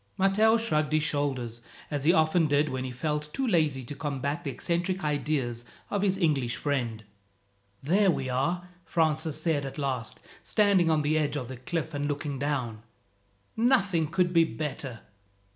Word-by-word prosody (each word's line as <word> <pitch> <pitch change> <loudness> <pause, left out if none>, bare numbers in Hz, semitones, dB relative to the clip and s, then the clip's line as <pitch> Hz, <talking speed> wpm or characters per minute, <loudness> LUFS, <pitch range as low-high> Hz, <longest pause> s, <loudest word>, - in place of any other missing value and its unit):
Matteo 210 +4 +4
shrugged 155 -9 0
his 155 -1 +3
shoulders, 135 -6 -1 0.3
as 145 -1 -2
he 165 - +7
often 160 -1 +3
did 145 +1 +2
when 130 0 -3
he - - -3
felt 150 +4 -3
too 270 - 0
lazy 155 - +2
to 120 - -7
combat 145 +2 -3
the - - -3
eccentric 180 +2 -1
ideas 145 -5 -1 0.3
of 205 - 0
his 195 -1 +2
English 145 -9 +1
friend. 120 -7 -2 0.8
"There 190 +7 +3
we 135 -6 0
are," 170 +8 -1 0.2
Francis 155 -2 0
said 155 -3 0
at 135 +1 -6
last, 130 -6 -3 0.2
standing 200 -5 +3
on 155 -2 +2
the 155 +2 +2
edge 145 -1 0
of 130 -4 -4
the 130 - -6
cliff 160 +5 -3
and 145 0 -1
looking 145 -1 -3
down. 130 -6 -2 0.7
"Nothing 200 - +3
could 175 +2 +1
be 165 -1 +6
better." 140 -6 -4
150 Hz, 165 wpm, -28 LUFS, 135-170 Hz, 0.8 s, he